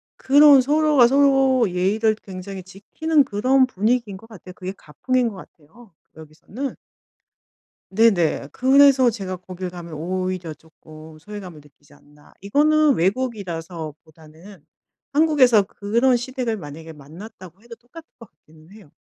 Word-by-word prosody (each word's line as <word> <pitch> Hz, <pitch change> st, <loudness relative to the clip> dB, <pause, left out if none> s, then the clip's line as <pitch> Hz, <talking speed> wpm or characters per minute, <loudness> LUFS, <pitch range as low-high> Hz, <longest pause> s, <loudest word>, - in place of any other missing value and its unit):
그런 285 Hz, 0 st, +5 dB
서로가 295 Hz, -2 st, +3 dB
서로 270 Hz, -3 st, +2 dB
예의를 205 Hz, +5 st, 0 dB
굉장히 190 Hz, -1 st, -10 dB
지키는 280 Hz, -, -1 dB
그런 260 Hz, +4 st, +2 dB
분위기인 225 Hz, -1 st, -1 dB
것 225 Hz, +4 st, -17 dB
같아요. 185 Hz, -4 st, -13 dB
그게 185 Hz, 0 st, -6 dB
가풍인 250 Hz, -, -2 dB
것 210 Hz, -, -11 dB
같아요. 185 Hz, +4 st, -17 dB, 0.2 s
여기서는. 160 Hz, -, -8 dB, 1.2 s
네네. 190 Hz, -9 st, +1 dB
그래서 265 Hz, -1 st, +4 dB
제가 195 Hz, -4 st, -6 dB
거길 185 Hz, 0 st, -8 dB
가면 175 Hz, -2 st, -11 dB
오히려 185 Hz, +1 st, -4 dB
쪼끔 155 Hz, 0 st, -16 dB
소외감을 190 Hz, -4 st, -10 dB
느끼지 145 Hz, 0 st, -24 dB
않나. 145 Hz, 0 st, -23 dB
이거는 300 Hz, +7 st, +2 dB
외국이라서 175 Hz, -, -3 dB
보다는 160 Hz, +3 st, -17 dB, 0.5 s
한국에서 280 Hz, -7 st, +4 dB
그런 230 Hz, +6 st, 0 dB
시댁을 245 Hz, -2 st, -4 dB
만약에 160 Hz, -2 st, -10 dB
만났다고 180 Hz, +5 st, -14 dB
해도 235 Hz, 0 st, -13 dB
똑같을 280 Hz, +8 st, -16 dB
것 230 Hz, -4 st, -14 dB
같기는 155 Hz, +2 st, -22 dB
해요. 205 Hz, -8 st, -17 dB
200 Hz, 320 characters per minute, -21 LUFS, 170-255 Hz, 1.2 s, 그런